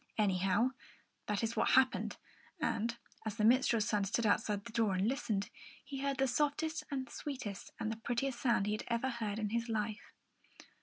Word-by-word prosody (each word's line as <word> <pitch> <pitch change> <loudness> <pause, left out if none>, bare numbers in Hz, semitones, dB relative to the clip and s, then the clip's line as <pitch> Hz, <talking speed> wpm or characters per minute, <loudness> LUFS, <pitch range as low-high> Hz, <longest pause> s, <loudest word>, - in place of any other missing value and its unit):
Anyhow, 195 +2 +3 0.6
that 210 +1 0
is 225 0 -1
what - - +2
had - - +5
happened; 255 - -5 0.4
and 230 +2 0 0.3
as 220 -2 -3
the 215 -2 +2
minstrel's 235 -2 +4
son 210 -2 +2
stood 210 +4 0
outside 205 -1 +1
the 235 - -7
door 220 -4 +2
and 190 +3 +2
listened, 215 -6 -1 0.3
he 275 -2 -5
heard 275 0 0
the 270 - +3
softest 300 +4 0
and 265 -2 -2
the - - -17
sweetest 255 -9 -5
and 220 - -1
the 220 - -4
prettiest 240 +2 -2
sound 235 -6 +3
he 210 - 0
had 215 - -2
ever 235 +2 0
heard 220 -4 -2
in 215 -2 -1
his 235 +1 -1
life. 215 -1 -2
230 Hz, 195 wpm, -35 LUFS, 210-255 Hz, 0.6 s, had